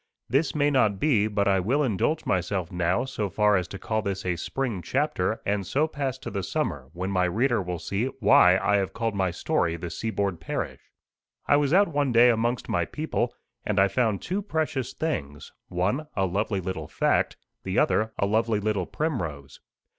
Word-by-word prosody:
This 145 +5 +1
may 145 0 +2
not 110 -8 +2
be, 115 -9 +3
but 100 -2 0
I 95 -1 +3
will 130 +11 +1
indulge 135 - 0
myself 90 -1 -1
now 90 +7 0
so 110 -6 -3
far 105 +1 +3
as 90 -2 0
to 100 - -7
call 110 +2 -1
this 100 -2 -3
a 90 -1 0
spring 115 +3 -3
chapter, 110 - 0
and 100 0 0
so 140 - +1
pass 140 -4 -3
to 130 - -7
the 100 - -2
summer, 85 - -3
when 95 +3 -3
my 90 -1 +2
reader 115 +5 +1
will 90 -1 -4
see 100 +7 -2
why 95 -4 +6
I 100 +1 +2
have 95 -1 -1
called 115 -1 -1
my 95 -2 +1
story 85 -1 0
"The 85 0 -6
Seaboard 100 -4 -2
Parish." 80 - -4 0.6
I - - +4
was 145 -1 +1
out 200 +4 +5
one 145 -4 0
day 120 +1 +6
amongst 120 +2 -1
my - - +1
people, 150 -5 -2 0.3
and 105 -1 0
I 100 - +6
found 110 -1 0
two 190 +3 -2
precious 155 - -2
things: 75 - -4 0.2
one, 105 - -1
a 95 - +2
lovely 100 +2 -1
little 90 -4 -4
fact, - - +1 0.2
the - - -3
other 110 +1 +2
a - - +1
lovely 110 +1 +1
little 105 -3 -1
primrose. 85 - -4
105 Hz, 190 wpm, -26 LUFS, 95-130 Hz, 0.6 s, why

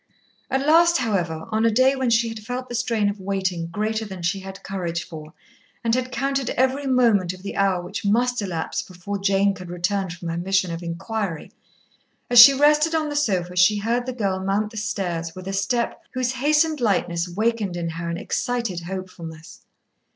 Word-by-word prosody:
At 270 +1 0
last, 340 +2 +5
however, 175 -9 -1
on 220 +1 +1
a 230 - +5
day 255 +5 +4
when 260 -2 0
she 230 0 +3
had 225 -1 -6
felt 250 +4 -5
the - - -6
strain 230 -3 0
of 205 0 -2
waiting 190 -3 -2
greater 215 +5 -2
than 190 -4 -8
she 185 +4 0
had 195 0 -10
courage 175 -4 -3
for, 155 -2 -10 0.5
and 230 -1 +1
had 255 +1 0
counted 275 -1 -1
every 265 +2 +1
moment 230 -9 +3
of 185 0 -13
the 200 - -5
hour 190 -3 +1
which 190 +4 -6
must 240 +4 +1
elapse 175 -5 -3
before 190 +2 -6
Jane 195 0 +2
could 180 -2 -10
return 180 +2 -1
from 170 0 -6
her 165 - -3
mission 190 0 +1
of 165 +1 -5
inquiry, 180 +1 -4 0.8
as 245 - +8
she 240 +4 +12
rested 300 +3 +3
on 310 -1 0
the 290 - -4
sofa 185 -11 0
she 180 +4 +5
heard 235 +4 -1
the - - -1
girl 200 -6 -1
mount 200 +3 -1
the 225 - -10
stairs 175 -6 -3
with 185 0 -9
a 195 - -3
step 235 +5 -1
whose 255 -1 0
hastened 300 +3 +1
lightness 175 -5 +1
wakened 210 -1 -1
in 170 -1 -2
her 170 +1 -5
an 170 - -3
excited 235 -4 -2
hopefulness. 170 -3 -8
200 Hz, 195 wpm, -23 LUFS, 180-245 Hz, 0.8 s, she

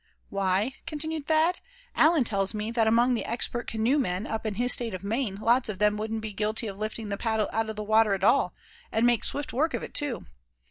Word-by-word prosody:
"Why," 195 +6 0
continued 315 -1 -3
Thad, 320 +3 +2 0.4
"Allan 315 -3 +4
tells 200 -2 0
me 210 +1 -3
that 230 -2 +2
among 240 +3 +4
the 235 - -1
expert 240 +1 -1
canoemen 220 -4 0
up 225 -1 -3
in 210 - -3
his 245 +3 +4
State 230 -5 0
of 185 - -8
Maine 220 0 -1
lots 235 +4 +2
of 205 - -4
them 210 +1 +2
wouldn't 220 +1 -3
be 215 -1 -5
guilty 215 +3 0
of 200 -2 -6
lifting 215 0 -4
the 200 - -2
paddle 220 -1 0
out 225 0 0
of 220 - -4
the 210 - -4
water 215 -1 +3
at 190 - -7
all, 275 +7 +3 0.4
and 225 +2 +2
make 240 -2 +3
swift 285 0 -3
work 315 +6 +1
of - - -4
it - - -8
too. 285 -6 -1
225 Hz, 225 wpm, -27 LUFS, 210-245 Hz, 0.4 s, Allan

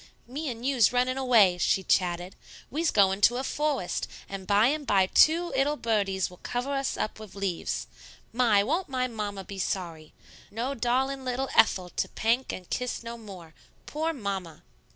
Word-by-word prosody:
"Me 285 +5 -4
and 235 0 -6
you's 260 -6 +4
yunnin' 250 +1 +1
away," 225 -9 +4
she 190 - +2
chatted; 180 0 0 0.4
"we's 320 +3 0
goin' 195 -1 +3
to 240 +3 +5
a 260 - -2
fowest, 290 -9 -1 0.2
and 195 -1 -7
by 205 +2 +4
and 290 +2 0
by 195 -2 +4
two 325 - +4
'ittle 280 +3 +2
birdies 200 -6 0
will 180 - -15
cover 250 +3 -3
us 275 -1 -1
up 215 - -3
wid 215 -2 -11
leaves. 195 -4 -2 0.5
My! 225 -4 +4
Won't 325 - -1
my 255 -1 0
mamma 205 -4 -5
be 195 +1 -8
sorry? 170 -5 -4 0.4
No 235 +6 -3
darlin' 265 +2 -1
'ittle 260 +2 -1
Ethel 185 -4 +4
to - - -2
pank 235 +4 0
and 180 -1 -8
tiss 250 -1 -2
no 235 0 -6
more. 190 -8 -11 0.3
Poor 315 +2 -2
Mamma!" 195 - -5
230 Hz, 175 wpm, -27 LUFS, 195-265 Hz, 0.5 s, to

